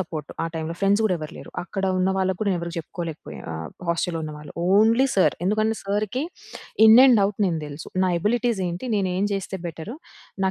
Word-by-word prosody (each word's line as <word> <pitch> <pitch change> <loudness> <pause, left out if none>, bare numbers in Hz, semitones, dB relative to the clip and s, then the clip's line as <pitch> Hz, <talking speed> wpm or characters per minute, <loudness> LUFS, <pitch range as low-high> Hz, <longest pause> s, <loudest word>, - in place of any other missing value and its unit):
Support. 160 -5 -5
ఆ - - -1
టైమ్‌లో. 160 +1 -3
Friends 200 +2 +3
గూడా 200 -4 +2
ఎవరు 155 -1 -7
లేరు. - - -10
అక్కడ 195 +1 -4
ఉన్న 185 +1 +2
వాళ్ళకి 190 -1 0
కూడా 210 -2 +1
నేనెవరికి 170 -1 -4
జెప్పుకోలేకపోయా 165 0 -7
ఆహ్, 80 0 -6 0.2
హాస్టల్లో 170 0 0
ఉన్నవాళ్ళు. 150 -1 -8 0.2
Only 230 +5 +5
sir. 190 - +4
ఎందుకంటే 215 +2 +1
సార్‌కి 210 +6 -1 0.6
ఇన్ 220 +1 +9
అండ్ 235 -5 +6
ఔట్ 200 0 -5
నేను 165 -3 0
దెలుసు. 145 +1 -8 0.2
నా 185 - +2
ఎబిలిటీస్ 235 0 +1
ఏంటి? 175 +8 -5
నేను 190 -2 0
ఏం 195 +2 +1
చేస్తే 195 0 -3
బెటర్? 165 +5 -6 0.5
నా 190 - +3
190 Hz, 190 wpm, -24 LUFS, 165-210 Hz, 0.6 s, ఇన్